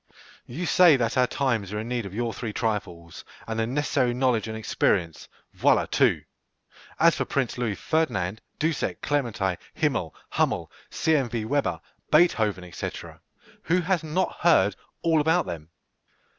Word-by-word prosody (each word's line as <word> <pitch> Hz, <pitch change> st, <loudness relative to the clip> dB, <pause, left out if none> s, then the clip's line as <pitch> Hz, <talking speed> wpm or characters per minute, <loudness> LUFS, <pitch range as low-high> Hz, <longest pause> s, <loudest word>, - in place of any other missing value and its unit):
You 160 Hz, +9 st, -4 dB
say 175 Hz, -2 st, +6 dB
that 115 Hz, -2 st, 0 dB
our 125 Hz, -1 st, +4 dB
times 115 Hz, -9 st, -1 dB
are 105 Hz, -, -3 dB
in 110 Hz, -, -5 dB
need 120 Hz, -4 st, -2 dB
of 95 Hz, -, -11 dB
your 115 Hz, 0 st, -2 dB
three 110 Hz, -3 st, -5 dB
trifles, 90 Hz, -8 st, -3 dB, 0.2 s
and 115 Hz, 0 st, -3 dB
the 110 Hz, -, 0 dB
necessary 130 Hz, -2 st, 0 dB
knowledge 125 Hz, -4 st, +1 dB
and 110 Hz, 0 st, -5 dB
experience. 90 Hz, -6 st, 0 dB, 0.3 s
Voilà -, -, +3 dB
tout! -, -, +3 dB, 0.8 s
As -, -, +6 dB
for -, -, -1 dB
Prince 135 Hz, -4 st, -1 dB
Louis 115 Hz, -5 st, -1 dB
Ferdinand, 110 Hz, -, -1 dB, 0.2 s
Dussek, 160 Hz, -1 st, -1 dB
Clementi, 115 Hz, -10 st, 0 dB, 0.2 s
Himmel, 130 Hz, -, -1 dB, 0.2 s
Hummel, -, -, 0 dB, 0.2 s
C.M.v. 120 Hz, -8 st, 0 dB
Weber, 145 Hz, +4 st, 0 dB, 0.3 s
Beethoven, 105 Hz, -, +2 dB
&c., -, -, -3 dB, 0.8 s
who 180 Hz, +3 st, +2 dB
has 180 Hz, 0 st, 0 dB
not 170 Hz, +4 st, -1 dB
heard 105 Hz, -, +4 dB, 0.3 s
all 165 Hz, -2 st, +3 dB
about 160 Hz, +4 st, +2 dB
them? 85 Hz, -3 st, -7 dB
120 Hz, 145 wpm, -26 LUFS, 105-150 Hz, 0.8 s, say